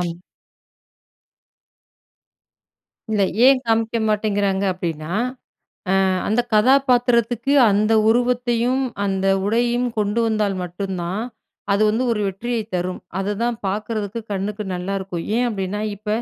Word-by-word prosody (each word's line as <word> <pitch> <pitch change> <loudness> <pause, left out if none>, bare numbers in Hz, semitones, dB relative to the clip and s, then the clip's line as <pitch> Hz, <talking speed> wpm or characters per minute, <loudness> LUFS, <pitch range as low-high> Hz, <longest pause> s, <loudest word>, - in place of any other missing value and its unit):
ஆமா. 175 -1 -2 3.0
இல்ல, 210 -2 +2 0.2
ஏன் 265 -1 +6
காமிக்க 225 0 +1
மாட்டேங்கிறாங்க 205 -2 0
அப்டின்னா, 165 -2 -4 0.8
அ - - +3 0.4
அந்த 220 +3 +2
கதாபாத்திரத்துக்கு 245 0 +3 0.2
அந்த 215 +2 +2 0.2
உருவத்தையும், 245 +1 +1 0.2
அந்த 195 -1 -1 0.2
உடையையும், 240 +3 +1
கொண்டு 210 +2 +1
வந்தால் 210 -3 0
மட்டுந்தான், 185 +2 -4 0.5
அது 200 +2 +2
வந்து 225 +4 0
ஒரு 210 - -1
வெற்றியைத் 220 +2 -4
தரும். 180 +1 -2 0.2
அது 195 +1 -1
தான் 240 -1 0
பாக்குறதுக்கு, 210 +2 -3
கண்ணுக்கு 205 +2 -3
நல்லாருக்கும். 185 -1 -4
ஏன் 245 0 +2
அப்டின்னா, 200 0 -3 0.2
இப்ப 210 +1 -11
210 Hz, 105 wpm, -21 LUFS, 195-235 Hz, 3.0 s, ஏன்